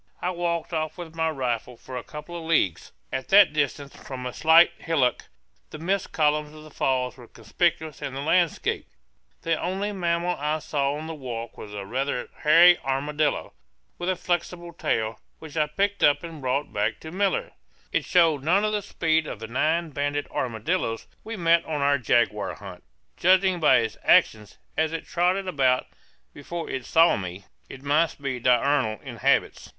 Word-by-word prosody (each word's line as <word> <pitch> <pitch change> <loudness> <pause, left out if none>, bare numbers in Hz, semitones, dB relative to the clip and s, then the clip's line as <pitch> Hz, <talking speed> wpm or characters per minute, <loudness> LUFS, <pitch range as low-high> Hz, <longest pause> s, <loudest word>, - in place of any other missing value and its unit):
I 180 - -1
walked 170 -1 -2
off 155 +1 -2
with 170 -3 -8
my 160 0 0
rifle 125 -4 -3
for 130 - -10
a 125 - -4
couple 150 +3 -9
of 170 -1 -6
leagues; 150 - +1 0.2
at 130 0 -3
that 195 -5 +6
distance, 145 -1 -2
from 130 -2 -8
a 125 - -4
slight 160 +2 +6
hillock, 140 -7 0 0.4
the - - -8
mist 185 +5 -2
columns 150 0 0
of 155 - -12
the 155 - -13
falls 130 -2 -1
were 120 -2 -13
conspicuous 155 - -2
in 135 - -5
the 135 - -4
landscape. 170 +2 +1 0.6
The 165 - 0
only 190 +4 -2
mammal 175 -2 0
I 150 +2 0
saw 145 -2 -1
on 155 +1 -6
the 160 - -5
walk 120 -6 -6
was 105 -1 -9
a 100 -1 -5
rather 125 +3 -2
hairy 170 +3 +7
armadillo, 145 +2 -1 0.5
with 175 +1 -2
a 185 - +1
flexible 175 0 -3
tail, 110 -8 -1 0.2
which 160 -1 -11
I 155 -1 +2
picked 200 +6 -1
up 145 +3 +4
and 165 -3 -8
brought 135 +3 -1
back 105 +1 -1
to 160 - -8
Miller 195 +1 0 0.4
it - - 0
showed 165 -5 +3
none 185 +7 +3
of 215 - 0
the 210 - 0
speed 160 -5 0
of - - -5
the 115 - -6
nine 155 +7 0
banded 145 +1 -2
armadillos 115 - -2 0.2
we 225 0 -6
met 170 -1 +3
on 150 -2 -3
our 140 0 +3
jaguar 120 -4 +1
hunt. 95 -3 -11 0.3
Judging 185 0 +3
by 150 -5 +5
its 110 -2 -4
actions, 105 -2 +3 0.2
as 160 0 0
it 165 - -4
trotted 185 +2 0
about 130 -7 +2 0.5
before 165 +4 -6
it 130 -2 -4
saw 165 +1 +5
me, 95 0 -7 0.2
it 135 - -10
must 150 +3 +1
be 135 -3 -3
diurnal 125 -2 +2
in - - -8
habits. - - +1
150 Hz, 180 wpm, -25 LUFS, 130-170 Hz, 0.6 s, hairy